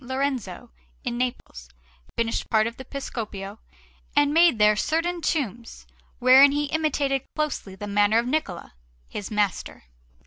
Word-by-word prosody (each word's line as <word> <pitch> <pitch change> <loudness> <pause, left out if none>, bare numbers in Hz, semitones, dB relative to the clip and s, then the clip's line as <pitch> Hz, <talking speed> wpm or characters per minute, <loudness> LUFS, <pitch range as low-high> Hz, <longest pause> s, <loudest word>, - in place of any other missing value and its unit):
Lorenzo 255 -5 -3 0.3
in 240 -1 -3
Naples, 240 - -4 0.5
finished 230 -1 -1
part 220 -1 +3
of 230 +1 -5
the 260 - -8
Piscopio, 215 -7 -6 0.6
and 290 0 +3
made 335 -5 +5
there 210 0 +5
certain 335 +8 -1
tombs, 240 - -3 0.3
wherein 265 +3 +7
he 295 0 0
imitated 285 -3 0
closely 300 -11 -3
the 205 - -7
manner 205 +1 +2
of 235 - +1
Niccola, 250 - -3 0.3
his 200 - -6
master. 210 - -2
245 Hz, 135 wpm, -24 LUFS, 210-285 Hz, 0.6 s, wherein